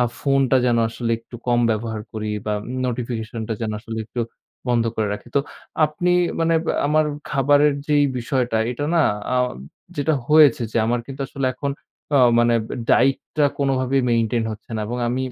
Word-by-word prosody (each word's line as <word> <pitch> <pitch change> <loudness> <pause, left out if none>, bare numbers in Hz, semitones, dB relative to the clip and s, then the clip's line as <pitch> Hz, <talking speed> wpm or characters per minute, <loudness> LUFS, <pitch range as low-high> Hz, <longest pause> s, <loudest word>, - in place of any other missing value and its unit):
আ - - +5 0.2
ফোনটা 135 -2 +3
যেন 120 -1 +3
আসলে 115 0 -4
একটু 120 +1 -12
কম 120 -1 +3
ব্যবহার 110 0 -2
করি 110 -1 -4 0.2
বা 105 - 0 0.3
নোটিফিকেশনটা 115 -2 -4
যেন 110 - -2
আসলে 115 -1 -6
একটু 120 +2 -5 0.5
বন্ধ 120 -1 +2
করে 110 -2 0
রাখি। 105 - -7
তো - - +5 0.4
আপনি 155 +4 -1 0.3
মানে 165 0 +2 0.3
আমার 155 +1 +3 0.3
খাবারের 145 +1 +4
যেই 145 -1 +3
বিষয়টা, 120 -1 -1
এটা 135 +4 -3
না 170 - +4 0.4
আ - - +2 0.6
যেটা 150 +2 +1
হয়েছে 150 -6 +6
যে - - -2
আমার 120 +1 +1
কিন্তু 135 0 -9
আসলে 135 -1 -2
এখন 140 +2 -3 0.5
আ - - +6 0.2
মানে 120 0 +4 0.3
ডায়েটটা 135 +2 +2
কোনভাবেই 135 -1 +1
মেইনটেইন 115 0 +1
হচ্ছে 110 +2 -12
না - - -2
এবং 120 +2 -4
আমি 130 +2 -1
125 Hz, 165 wpm, -22 LUFS, 115-140 Hz, 0.6 s, হয়েছে